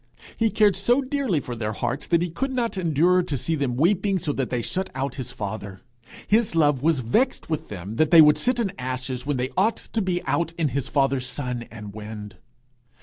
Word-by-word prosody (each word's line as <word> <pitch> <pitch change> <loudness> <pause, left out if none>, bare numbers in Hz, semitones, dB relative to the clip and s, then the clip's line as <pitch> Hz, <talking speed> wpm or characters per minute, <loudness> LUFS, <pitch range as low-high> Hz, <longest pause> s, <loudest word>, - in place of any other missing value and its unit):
He 225 -1 +2
cared 210 -2 +3
so 240 +8 +2
dearly 260 - 0
for 125 -3 -6
their 110 -1 -3
hearts 120 +5 -3
that 170 0 +3
he 175 - -3
could 265 +11 -2
not 240 -4 -1
endure 175 +1 +3
to 160 -6 -3
see 165 +7 -2
them 140 -5 -1
weeping 190 +7 +2
so 150 -4 -2
that 135 -3 -2
they 120 -2 -2
shut 190 +8 -2
out 135 0 -2
his 125 - -6
father. 100 -2 -6 0.4
His 215 -4 +2
love 145 -5 +3
was 155 -2 +2
vexed 165 - 0
with 155 - -2
them 100 +3 -6
that 155 - +3
they 170 - +8
would 150 -1 +7
sit 250 0 +1
in 210 -5 0
ashes 130 0 -4
when 145 -2 0
they 125 +1 -2
ought 215 +5 +2
to 225 - -3
be 180 -2 -1
out 170 -1 0
in 165 -3 0
his 135 +1 -2
father's 135 -2 +1
sun 125 -3 -4
and 105 -3 -9
wind. 105 0 -8
150 Hz, 215 wpm, -24 LUFS, 125-185 Hz, 0.4 s, they